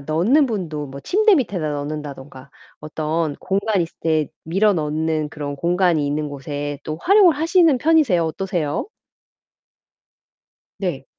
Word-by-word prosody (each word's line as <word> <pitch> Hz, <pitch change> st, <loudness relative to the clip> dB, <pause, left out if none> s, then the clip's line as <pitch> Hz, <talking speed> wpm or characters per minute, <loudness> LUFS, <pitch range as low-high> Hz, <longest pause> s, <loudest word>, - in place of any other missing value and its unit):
넣는 180 Hz, -, +2 dB
분도 165 Hz, -10 st, -4 dB
뭐 140 Hz, 0 st, -9 dB
침대 425 Hz, -, +3 dB
밑에다 200 Hz, -, -1 dB
넣는다든가 145 Hz, -2 st, -7 dB, 0.3 s
어떤 155 Hz, 0 st, -2 dB
공간이 200 Hz, 0 st, 0 dB
있을 165 Hz, -, -8 dB
때 155 Hz, -3 st, +1 dB, 0.2 s
밀어 195 Hz, +6 st, +2 dB
넣는 155 Hz, -1 st, -1 dB
그런 145 Hz, -2 st, -5 dB
공간이 170 Hz, -2 st, +1 dB
있는 150 Hz, +1 st, -2 dB
곳에 145 Hz, +1 st, -5 dB
또 155 Hz, -, -4 dB
활용을 385 Hz, -4 st, +5 dB
하시는 330 Hz, -1 st, +3 dB
편이세요? 295 Hz, -, +3 dB
어떠세요? 160 Hz, -3 st, -2 dB, 1.9 s
네. 175 Hz, -9 st, -3 dB
160 Hz, 280 characters per minute, -21 LUFS, 150-205 Hz, 1.9 s, 활용을